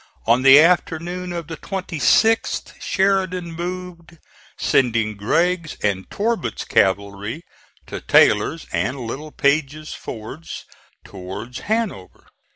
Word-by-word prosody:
On 115 +3 +4
the 135 +2 +9
afternoon 175 +1 +1
of 170 -2 -4
the 160 - -7
26th 195 +4 +1
Sheridan 190 -3 0
moved, 175 -1 -7 0.4
sending 115 -4 +1
Gregg's 165 - 0
and 95 -2 -1
Torbert's 225 -2 -2
cavalry 100 - 0 0.4
to - - -7
Taylor's - - +3
and 105 +11 -1
Littlepage's 145 +3 -1
fords 120 +9 -8 0.4
towards 95 +6 -8
Hanover. 215 - -2
155 Hz, 95 wpm, -21 LUFS, 115-180 Hz, 0.4 s, the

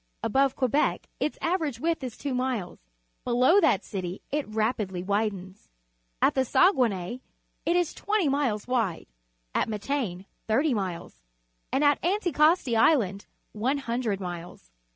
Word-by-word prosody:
Above 270 +3 +2
Quebec 270 +3 +1
its 300 - -1
average 320 -8 0
width 325 0 -1
is 250 -3 -5
two 280 -2 -3
miles; 250 -7 -2 0.4
below 255 +11 +4
that 210 - +3
city 185 -2 -5
it 295 0 -1
rapidly 215 -4 -1
widens. 200 - -3 0.5
At - - +5
the 265 - +2
Saguenay, 240 - +2 0.5
it 340 - +3
is 355 -3 +1
twenty 415 -5 0
miles 270 -7 0
wide, 230 -9 0 0.5
at - - 0
Matane 210 -4 -3 0.2
thirty 270 +6 +2
miles, 185 -5 -4 0.5
at 280 - +1 0.2
Anticosti 335 - +2
Island 220 - +3 0.2
one 250 +7 0
hundred 235 -6 -2
miles. 175 -2 -8
245 Hz, 130 wpm, -27 LUFS, 200-285 Hz, 0.5 s, At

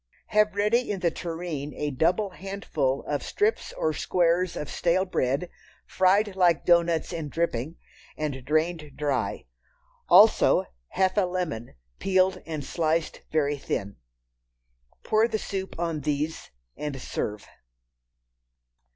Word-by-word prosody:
Have 210 -1 +3
ready 210 +5 +2
in 200 -3 -2
the 170 -3 +2
tureen 165 -4 -5
a 150 0 -2
double 180 +9 +1
handful 170 -9 -2
of 145 -1 -2
strips 420 +2 0
or 155 - -1
squares 175 +2 +1
of 150 - -4
stale 180 +5 +1
bread, 140 -2 0 0.4
fried 195 +2 +2
like 175 -3 +3
doughnuts 170 -1 +3
in 160 -3 -4
dripping, 160 -2 -2 0.4
and 140 -4 -3
drained 155 +1 0
dry. 135 -8 -1 0.6
Also, - - +6 0.2
half 190 - 0
a - - +6
lemon, 175 - -4 0.2
peeled 185 0 +2
and 155 -4 -4
sliced 165 -1 -1
very 145 -2 +1
thin. 100 - -3 1.1
Pour 220 +1 +3
the 220 - -1
soup 190 -2 -5
on 165 -2 -1
these 150 +2 -2 0.3
and 145 -3 -5
serve. 105 -4 -4
165 Hz, 125 wpm, -26 LUFS, 145-185 Hz, 1.1 s, Also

